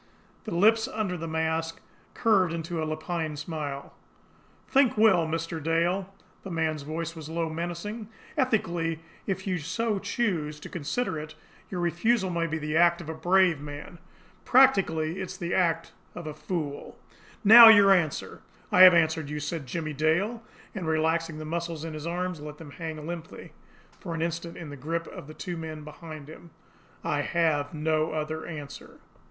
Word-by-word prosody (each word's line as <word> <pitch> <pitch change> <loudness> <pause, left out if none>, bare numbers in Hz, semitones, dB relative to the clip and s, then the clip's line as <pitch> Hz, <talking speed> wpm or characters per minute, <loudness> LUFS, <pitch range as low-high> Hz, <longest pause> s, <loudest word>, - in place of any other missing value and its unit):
The 215 - -4
lips 220 +5 +4
under 215 -7 -2
the 165 -1 -5
mask 160 0 -1 0.4
curved 195 -7 +3
into 165 0 -3
a - - -1
lupine 155 0 -3
smile. 145 -3 -5 0.7
"Think 265 -5 +3
well, 190 -7 +5
Mr. 165 0 -3
Dale!" 175 +5 0 0.3
The 195 - -8
man's 160 -3 -1
voice 160 +3 -4
was 160 -1 -8
low, 165 0 -2
menacing. 175 +7 -5 0.3
"Ethically, 175 - 0 0.3
if 190 -1 -2
you 185 -2 -1
so 200 +7 -1
choose 165 -11 -2
to - - -8
consider 165 +3 -2
it, 155 0 -8 0.3
your 180 - -4
refusal 185 +4 +1
may 170 -1 0
be 160 0 -2
the 150 0 -3
act 170 +1 +5
of 165 -2 -8
a - - -3
brave 175 -1 +3
man; 145 +3 -9 0.4
practically, 185 -10 +3
it 190 - -5
is - - -7
the 175 0 -3
act 165 -3 +1 0.2
of 175 - -7
a 155 - -5
fool. 150 -2 -5 0.5
Now 225 +3 +11
your 205 -3 +8
answer!" 165 -6 -1 0.3
"I 180 - +5
have 185 -1 +10
answered 160 -2 +2
you," 150 0 -3
said 150 -1 -4
Jimmie 155 +2 -3
Dale 170 - +1 0.3
and, 185 -5 -4
relaxing 160 0 0
the 155 - -6
muscles 165 0 -4
in 160 - -5
his 155 +1 -6
arms, 180 -1 -3
let 150 0 -8
them 150 -3 -11
hang 160 -1 -6
limply 165 -1 -8 0.5
for 170 -4 -5
an 165 - -1
instant 170 0 -4
in 165 -4 -8
the - - -7
grip 165 +5 -3
of - - -10
the 155 - -11
two 175 -2 -5
men 155 -2 -6
behind 155 -1 -10
him. 160 +2 -12 0.5
"I 145 - 0
have 155 -2 0
no 155 0 0
other 155 +1 -3
answer." 145 -4 -9
165 Hz, 170 wpm, -27 LUFS, 155-180 Hz, 0.7 s, Now